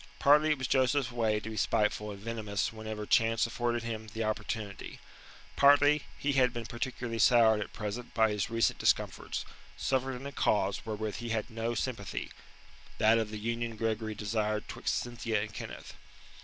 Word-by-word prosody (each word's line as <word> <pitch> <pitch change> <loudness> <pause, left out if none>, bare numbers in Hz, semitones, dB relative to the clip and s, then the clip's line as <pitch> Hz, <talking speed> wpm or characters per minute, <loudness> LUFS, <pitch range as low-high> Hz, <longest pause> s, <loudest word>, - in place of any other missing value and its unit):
Partly 150 +2 +5
it 150 - +2
was 130 - -3
Joseph's 130 0 +2
way 110 -3 +1
to 110 - -7
be - - -6
spiteful 105 0 +1
and 100 -1 -7
venomous 110 -1 -2
whenever 110 -1 -5
chance 115 +1 +3
afforded 120 0 -1
him 110 -1 -5
the 110 +1 -4
opportunity. 110 -1 -4 0.6
Partly 145 +1 +5
he 145 - 0
had 130 -2 +4
been 120 -1 -5
particularly 120 -1 -4
soured 110 -2 +5
at - - -5
present 105 +4 -5
by 110 -1 +4
his 105 0 -1
recent 115 0 +1
discomforts, - - 0 0.3
suffered 130 0 0
in 130 +2 -8
a 140 - -5
cause 100 -4 0
wherewith 110 -1 -3
he 120 -1 -5
had 115 -1 -2
no, 115 +1 -2
sympathy 110 -4 -3 0.7
that 110 +1 +5
of 110 -1 -2
the 105 - -5
union 115 +1 -3
Gregory 110 -1 -2
desired 105 0 -1
'twixt - - -2
Cynthia 115 -2 -2
and 105 +1 -4
Kenneth. - - -8
115 Hz, 170 wpm, -31 LUFS, 110-120 Hz, 0.7 s, Partly